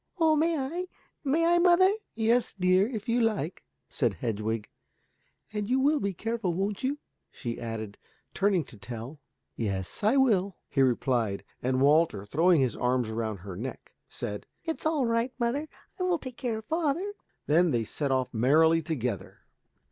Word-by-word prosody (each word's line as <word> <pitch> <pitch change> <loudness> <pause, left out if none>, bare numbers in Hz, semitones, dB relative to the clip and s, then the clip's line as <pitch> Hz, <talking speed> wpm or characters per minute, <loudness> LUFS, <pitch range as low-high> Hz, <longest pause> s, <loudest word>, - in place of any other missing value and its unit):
"Oh, 320 -1 +5
may 325 +2 +2
I? 330 +7 -3 0.4
May 310 +4 +2
I, 345 +1 +4
mother?" 365 +2 +5 0.2
"Yes, 230 +2 +2
dear, 185 +2 +4
if 220 -4 -5
you 240 +1 +2
like," 205 -7 -1 0.2
said - - 0
Hedwig. 110 -1 -2 0.9
"And 210 0 -2
you 260 +1 +3
will 290 +3 +3
be 200 -5 -1
careful, 210 -2 -2
won't 195 +4 -2
you?" 275 +3 0 0.3
she 120 -3 -6
added, 110 -3 -5 0.3
turning 195 -3 +2
to 120 - -14
Tell. 115 +7 -7 0.4
"Yes, 100 - -3
I 220 +6 +4
will," 200 -8 +3
he 135 - +1
replied, 120 -5 +1 0.2
and 130 +1 +1
Walter, 145 -8 +3
throwing 165 - +4
his 125 -4 +1
arms 125 -2 0
round 110 -4 -3
her 95 -1 -7
neck, 125 +7 -7 0.2
said, 105 0 -5 0.2
"It's 325 -1 -2
all 305 -5 +1
right, 230 +2 0
mother, 265 +6 -1 0.3
I - - -4
will 365 -1 +2
take 255 -5 -9
care 235 -3 -2
of 220 - -8
father." 330 - -1 0.3
Then 170 +4 +4
they 120 -5 +1
set 140 +6 -2
off 130 -2 0
merrily 160 +8 +4
together. 125 - -4
185 Hz, 165 wpm, -28 LUFS, -, 0.9 s, Oh